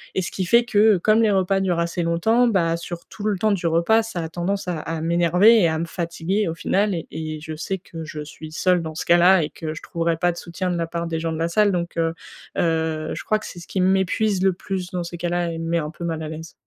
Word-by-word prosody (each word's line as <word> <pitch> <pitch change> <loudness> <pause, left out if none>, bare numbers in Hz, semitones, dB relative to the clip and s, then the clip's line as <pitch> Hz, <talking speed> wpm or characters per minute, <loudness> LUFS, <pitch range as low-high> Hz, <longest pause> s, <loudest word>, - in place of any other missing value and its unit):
et 190 - +1
ce 175 - -4
qui 190 - -2
fait 235 +6 +5
que, 215 -2 +4
comme 215 +5 +3
les 220 - +4
repas 195 0 +2
durent 185 -3 0
assez 170 +1 -1
longtemps, 220 +9 +2
bah, 170 -6 +1
sur 170 0 -7
tout 210 - -8
le 210 -3 +1
temps 215 +3 +2
du 180 -4 0
repas 170 +8 +3
ça 215 -6 -4
a 160 - -4
tendance 180 +3 -2
à 170 -3 -2
à 165 +1 -4
m'énerver 175 +7 +5
et 170 - +4
à 160 - 0
me 165 - -2
fatiguer 170 +4 -2
au 165 - -3
final. 195 +4 +1
Et 165 - -4
et 155 -1 -5
je 155 0 -6
sais 185 +4 -3
que 165 -3 -9
je 155 -1 -6
suis 155 +1 -10
seule 180 0 +2
dans 160 -1 -6
ce - - -4
cas-là 175 0 +5
et 150 - -3
que 155 -1 -6
je - - -9
trouverai 170 0 -1
pas 175 +1 +2
de 170 - -10
soutien 180 +1 -3
de 175 - -1
la 165 -1 -1
part 170 0 -3
des 165 -1 -2
gens 165 0 -2
de 160 - -4
la 165 - +1
salle, 210 +3 +3
donc 170 -2 -3
heu, 165 0 +1 0.5
heu, 160 -1 0
je - - -6
crois 215 - +1
que - - -10
c'est 175 - -9
ce 170 - -12
qui 190 - -1
m'épuise 190 +1 +2
le 190 -1 +4
plus 185 0 -5
dans 180 -1 -2
ces 175 0 -7
cas-là 175 0 -1
et 165 - -5
me 165 0 -4
met 170 - +1
un 150 - -3
peu 170 +2 -9
mal 160 -1 -2
à 155 - -5
l'aise. 160 +1 -8
170 Hz, 285 wpm, -22 LUFS, 165-190 Hz, 0.5 s, fait